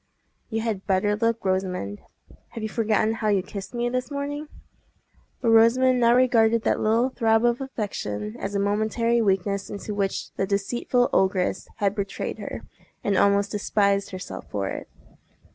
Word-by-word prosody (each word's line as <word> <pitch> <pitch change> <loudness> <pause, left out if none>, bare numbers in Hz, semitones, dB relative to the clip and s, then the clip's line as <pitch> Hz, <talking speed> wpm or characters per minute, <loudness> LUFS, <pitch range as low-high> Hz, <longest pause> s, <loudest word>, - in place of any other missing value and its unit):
"You 225 -1 -1
had 220 -4 -3
better 200 +2 +2
look, 230 +1 0
Rosamond. 185 - -1 0.5
Have 225 - -6
you 220 - -2
forgotten 220 -1 +1
how 225 -1 -2
you 200 -3 +2
kissed 200 +4 -8
me 240 0 0
this 255 +1 -2
morning?" 290 +1 -4 0.9
But 230 - +2
Rosamond 250 +3 +5
now 235 0 +5
regarded 230 -3 +4
that - - +1
little 230 +4 +2
throb 225 -2 +2
of 240 +2 +2
affection 105 - -4
as 200 +1 -4
a - - +1
momentary 220 +3 +1
weakness 200 -1 0
into 205 +1 -5
which 200 -1 -2
the 195 - 0
deceitful 240 +5 0
ogress 190 -1 +1
had 200 -1 +1
betrayed 200 -2 -4
her, - - -6 0.4
and 200 - +1
almost 200 +1 +3
despised 200 -1 +1
herself 185 -1 -8
for 100 -2 -2
it. - - -6
215 Hz, 160 wpm, -25 LUFS, 195-235 Hz, 0.9 s, Rosamond